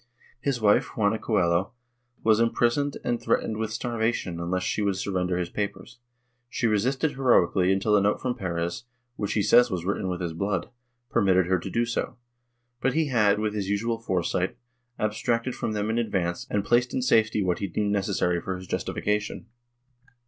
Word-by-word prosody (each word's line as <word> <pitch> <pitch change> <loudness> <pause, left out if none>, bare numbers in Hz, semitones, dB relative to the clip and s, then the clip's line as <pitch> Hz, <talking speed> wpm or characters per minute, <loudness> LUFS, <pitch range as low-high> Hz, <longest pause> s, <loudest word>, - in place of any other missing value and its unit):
His 135 -1 -1
wife, 110 +5 +2
Juana 110 0 +2
Coello, 90 -2 +1 0.5
was 110 -1 +4
imprisoned 120 +4 +1
and 120 -1 -1
threatened 110 - 0
with 110 -1 -2
starvation 115 -7 -2
unless 90 +2 -1
she 105 - -1
would 100 -2 +1
surrender 90 -2 -1
his 90 -1 -3
papers; 100 +1 -5 0.5
she 125 - -2
resisted 125 +8 +1
heroically 95 -8 +3
until 100 +2 +2
a 100 - +4
note 105 +1 +1
from 125 -1 -1
Perez, 85 +1 -3 0.3
which 105 -3 -2
he 105 - +1
says 120 +5 +6
was 90 -4 -3
written 95 -1 -1
with 90 -1 -2
his 85 -3 -3
blood, 95 +3 -2 0.4
permitted 95 -5 +3
her 95 +1 +1
to - - -6
do 120 0 +1
so, 115 +1 -3 0.6
but 135 - +1
he 160 -2 +1
had, 105 -5 +3
with 105 0 -1
his 100 -2 -3
usual 115 +3 -1
foresight, 95 +1 -1 0.4
abstracted 115 +3 -1
from 110 - -3
them 105 +1 -1
in 115 - 0
advance 90 -6 -1
and 100 -1 -1
placed 120 +2 +2
in 130 - 0
safety 110 -4 +3
what 90 -2 0
he 100 - -2
deemed 100 +3 -1
necessary 95 -3 0
for 95 - -3
his 95 - -9
justification. 105 +4 -2
105 Hz, 180 wpm, -26 LUFS, 95-115 Hz, 0.6 s, says